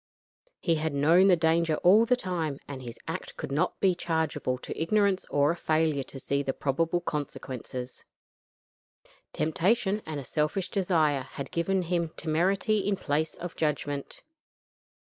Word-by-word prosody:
He 170 - +1
had 155 -1 -1
known 165 +7 +5
the 185 - +6
danger 165 -1 +2
all 210 +6 +6
the 250 - +4
time, 170 - -3
and 135 -2 -7
his 120 -2 -8
act - - -5
could - - -5
not 145 +3 0
be 190 -2 +4
chargeable 160 -6 -1
to - - -7
ignorance 200 +2 +2
or 145 +1 +3
a - - -2
failure 155 -3 +1
to 135 +1 -8
see 140 +2 -1
the 135 -1 -2
probable 165 +5 0
consequences. 130 -4 -5 1.3
Temptation, 195 +6 +1
and 145 -4 -4
selfish 155 +7 -1
desire, 160 -8 +2
had 140 - -6
given 185 +3 0
him 170 -1 0
temerity 190 +7 +1
in 200 0 0
place 155 -2 -1
of 175 0 -7
judgment. 145 -2 -2
160 Hz, 145 wpm, -28 LUFS, 145-185 Hz, 1.3 s, the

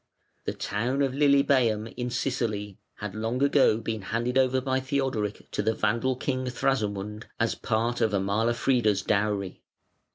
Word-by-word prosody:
The - - -1
town 125 +7 -1
of 135 - +1
Lilybæum, 135 -6 +3
in 125 0 -3
Sicily 110 -6 -2 0.2
had 105 -2 -6
long 115 +5 -1
ago 140 -6 +4
been 110 -1 -4
handed 115 +5 -2
over 130 0 +3
by 130 0 0
Theodoric 130 -6 -2
to - - -1
the 110 - +1
Vandal 115 +5 +1
king 130 0 -2
Thrasamund 105 -5 -1
as 115 -1 +2
part 115 +2 -1
of 110 - +4
Amalafrida's 105 +1 +1
dowry. 100 -2 -1
115 Hz, 140 wpm, -27 LUFS, 105-130 Hz, 0.2 s, ago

